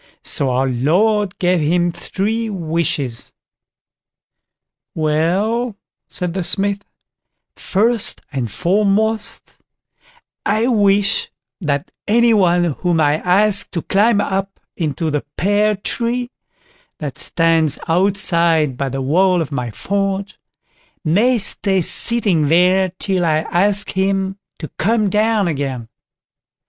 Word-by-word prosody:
So 140 - +1
our 130 +1 0
Lord 185 - +1
gave 180 -1 +1
him 175 +3 +1
three 220 +6 -3
wishes. 160 - -3 1.6
"Well", 185 +10 0 0.3
said 180 -2 -4
the 190 -1 -2
Smith, 200 +3 -1 0.7
"first 225 +3 0
and 125 -6 -3
foremost, 205 - -1 0.8
I 215 +3 +1
wish 205 -3 +2 0.3
that 145 -6 -2 0.2
any 235 +2 +4
one 175 -4 +3 0.2
whom 175 -3 0
I 150 0 +2
ask 200 +4 +2
to 170 - -3
climb 205 +2 +2
up 195 -1 -3 0.2
into 160 -1 -2
the 145 -1 -2
pear 205 +3 +2
tree 240 +4 -2 0.7
that 150 -1 -6
stands 165 -3 +1
outside 170 -5 +2
by 140 0 -2
the 135 +1 -4
wall 180 +6 +2
of 160 -3 -3
my 125 -4 -3
forge, 195 - -3 0.7
may 220 +11 +3
stay 195 -2 +2
sitting 190 -4 +2
there 180 +3 +3
till 190 -3 -1
I 155 -2 +1
ask 200 +3 +1
him 190 0 -1 0.2
to 155 - -7
come 215 +1 +1
down 215 -1 +1
again. 135 -7 -4
185 Hz, 110 wpm, -18 LUFS, 160-205 Hz, 1.6 s, any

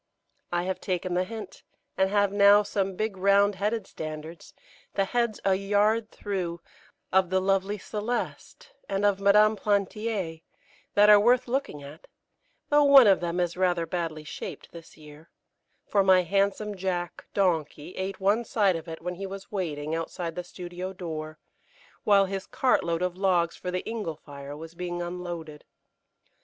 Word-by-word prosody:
I 175 0 0
have 190 +1 -3
taken 180 -1 -2
the 180 +1 +1
hint, 215 -2 -8 0.3
and 190 0 +2
have 205 -1 +2
now 205 +1 +6
some 195 -2 -2
big 215 +1 -2
round 200 +2 +4
headed 205 +2 -2
standards, 155 -1 -8 0.4
the 195 - +2
heads 235 +1 -1
a 195 - +4
yard 205 +3 +1
through, 180 -4 -4 0.5
of 190 -2 +4
the 190 0 +2
lovely 195 +2 0
Celeste 240 - -5 0.2
and 195 +1 0
of 200 -1 +2
Madame 210 +2 +5
Plantier, 200 -4 -1 0.5
that 205 +1 +6
are 205 - +9
worth 245 +4 +3
looking 240 - -2
at, 145 +3 -12 0.6
though 295 -1 +5
one 280 -3 +8
of 195 -2 +5
them 175 0 -2
is 175 -1 0
rather 180 -2 +1
badly 165 -2 -4
shaped 150 - -8
this 165 -1 -13
year, 150 +1 -15 0.6
for 200 -1 +2
my 185 -1 +5
handsome 200 +3 0
Jack 180 -2 -3
(donkey) 165 -4 0
ate 190 +1 -4
one 205 +4 +2
side 205 -5 +2
of 165 +1 -6
it 165 0 -8
when 180 +1 -3
he 195 +2 -6
was 195 +1 -9
waiting 155 -6 -3
outside 165 +1 -3
the 180 - -5
studio 180 +1 -7
door, 155 -4 -6 0.7
while 200 -1 +5
his 195 0 -5
cart 260 - +2
load 170 +1 -1
of 180 -1 -1
logs 180 -3 +2
for 180 - -6
the 180 0 -3
ingle 215 -8 -3
fire 140 0 -10
was 160 +1 -10
being 175 0 -4
unloaded. 175 -3 -6
190 Hz, 165 wpm, -27 LUFS, 170-205 Hz, 0.7 s, are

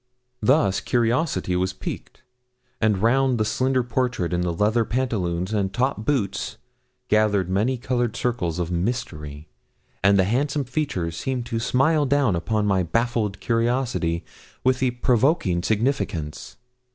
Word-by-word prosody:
Thus 110 -4 +3
curiosity 120 - 0
was 95 +1 0
piqued; - - -7 0.6
and 105 -3 +2
round 130 +2 +3
the 110 - +1
slender 130 +3 +1
portrait 120 -7 -1
in 90 - +1
the 90 -1 0
leather 105 +7 +2
pantaloons 105 -7 -1
and 100 -3 0
top 125 -1 -1
boots 120 -9 -1 0.5
gathered 105 -3 +2
many 110 +7 +1
coloured 120 -2 -1
circles 100 -11 -1
of 90 -1 -2
mystery, 80 -7 -3 0.6
and 100 +1 +5
the 95 - +5
handsome 140 +8 0
features 120 - -2
seemed 130 +2 -2
to 115 -1 -2
smile 140 +5 +2
down 135 -7 +2
upon 105 +5 0
my 95 -2 +2
baffled 110 +1 -1
curiosity 115 -8 0 0.4
with 130 0 +2
a 130 - +3
provoking 120 - +1
significance. 105 - -2
115 Hz, 135 wpm, -23 LUFS, 95-130 Hz, 0.6 s, and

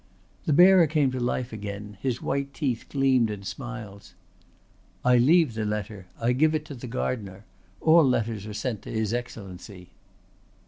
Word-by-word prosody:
The 155 - +2
bearer 180 +1 +7
came 145 -3 +1
to 130 - -3
life 120 0 -2
again, 105 0 -7
his 130 -2 -2
white 140 0 -2
teeth 130 -7 -2
gleamed 130 -4 +2
in 105 -2 -6
smiles. 110 -2 -8 0.9
"I 125 -1 +5
leave 155 +1 +4
the 110 0 -3
letter. 105 -2 -4
I 115 +1 +1
give 155 +5 +3
it 150 -1 -2
to 145 - -8
the 125 -1 -8
gardener. 105 -5 -4 0.4
All 165 +1 +6
letters 115 -5 0
are 105 - -6
sent 110 -1 -3
to - - -10
his 110 -1 -1
Excellency." 95 -6 -7
120 Hz, 165 wpm, -26 LUFS, 105-135 Hz, 0.9 s, bearer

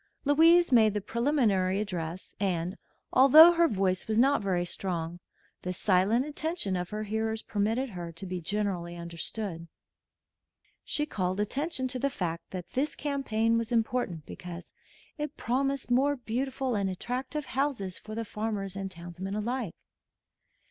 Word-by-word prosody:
Louise 330 +3 +6
made 220 -4 +5
the - - +1
preliminary 210 -5 +1
address, 180 -4 -4
and, 180 -2 -1 0.4
although 305 +6 +9
her 340 -1 +4
voice 190 - 0
was 220 0 0
not 270 +2 +4
very 180 -3 0
strong, 175 -2 -3 0.4
the 180 - -3
silent 195 +7 +2
attention 300 - -2
of 180 -1 -3
her 215 0 -3
hearers 220 +1 -2
permitted 225 +5 -1
her 175 -3 -6
to 165 +3 -7
be 180 -1 -4
generally 180 -2 -2
understood. 170 +1 -5 1.2
She 295 - 0
called 185 -8 -2
attention 260 +5 -1
to 255 0 -2
the 280 - +1
fact 170 -8 -4
that 180 -2 -7
this 280 +4 0
campaign 230 -6 0
was 230 +1 -4
important 225 -9 0
because 175 -1 -9 0.5
it 295 -1 -4
promised 270 +1 -1
more 275 +4 +3
beautiful 260 +1 -2
and 200 -3 0
attractive 255 +9 -3
houses 255 -9 -2
for 215 0 -8
the 230 0 -3
farmers 210 -3 -3
and 195 -1 -4
townsmen 180 +2 -6
alike. 230 -2 -2
215 Hz, 145 wpm, -29 LUFS, 185-260 Hz, 1.2 s, although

